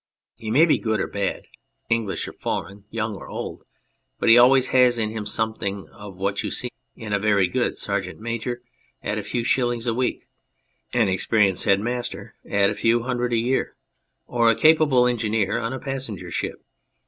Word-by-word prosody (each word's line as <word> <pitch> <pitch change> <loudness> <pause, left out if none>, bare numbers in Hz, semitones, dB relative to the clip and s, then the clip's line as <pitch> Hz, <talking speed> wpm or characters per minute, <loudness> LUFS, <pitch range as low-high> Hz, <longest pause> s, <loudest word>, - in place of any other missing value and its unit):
He 110 - -7
may 140 +9 +5
be 160 - +2
good 110 -2 -1
or - - 0
bad, 100 -1 -3 0.4
English 115 -4 -1
or - - -8
foreign, 100 +1 -5
young 110 -1 -3
or - - -10
old, - - -6 0.5
but - - +1
he 115 - +9
always 130 +2 +6
has 125 -2 +4
in 110 -2 -1
him 110 -2 -5
something 100 -4 -2
of 100 -2 -11
what 100 +1 -1
you - - -3
see 125 - 0 0.2
in 110 -4 -6
a 100 - +2
very 100 -2 +3
good - - -1
sergeant - - -3
major 115 +2 -4 0.4
at 105 +1 -2
a - - -5
few 115 +4 -2
shillings 120 -1 0
a 120 - +1
week, 125 +2 -2 0.6
an 120 -4 +2
experienced 95 0 +2
head 100 0 +4
master 120 +2 -4 0.2
at 100 -1 +3
a - - -1
few 115 +1 +2
hundreds 125 -1 -1
a - - +2
year, 125 +4 0 0.5
or 120 -1 +2
a 115 - +4
capable 150 -2 +5
engineer 110 -3 0
on 115 0 -3
a 130 - -3
passenger 135 -7 -5
ship. - - -4
115 Hz, 185 wpm, -23 LUFS, 105-125 Hz, 0.6 s, he